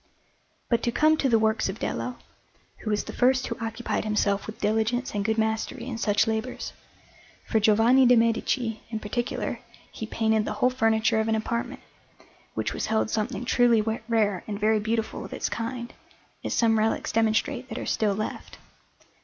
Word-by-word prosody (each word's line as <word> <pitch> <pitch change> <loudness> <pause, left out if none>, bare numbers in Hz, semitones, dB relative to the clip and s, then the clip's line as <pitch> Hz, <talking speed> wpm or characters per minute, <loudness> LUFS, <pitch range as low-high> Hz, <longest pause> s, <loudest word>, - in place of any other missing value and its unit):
But 235 -1 +1
to 235 - 0
come 310 +5 +4
to 275 - +1
the 230 - +5
works 220 -2 +1
of 190 - -4
Dello, 250 +1 -3 0.6
who 215 - -5
was 210 -1 0
the - - -8
first 255 +1 +3
who - - -4
occupied 225 +1 -2
himself 205 -2 0
with 215 - -8
diligence 220 +4 0
and 205 -1 -1
good 220 +1 0
mastery 220 +2 -1
in 240 -3 -5
such 210 -2 +2
labours; 225 +3 -3 0.7
for 220 - +1
Giovanni 225 +5 +5
de' 250 - +7
Medici, 230 0 +1
in 225 - -3
particular, 235 +3 -3 0.3
he 220 - -6
painted 220 -1 +1
the - - -2
whole 250 +4 +2
furniture 225 -2 +2
of 220 - 0
an 225 - +2
apartment, 235 +2 -3 0.7
which - - -2
was - - -3
held 220 0 +1
something 215 +3 -2
truly 240 -2 +4 0.3
rare 210 -5 +1
and 205 -1 -4
very 215 +1 +3
beautiful 225 +1 -2
of - - -8
its - - -2
kind, 235 +1 -4 0.5
as - - -2
some 225 -2 +3
relics 220 +1 0
demonstrate 225 +4 +1
that - - -5
are - - -4
still 210 -3 +1
left. 215 +1 -5
225 Hz, 180 wpm, -26 LUFS, 215-240 Hz, 0.7 s, de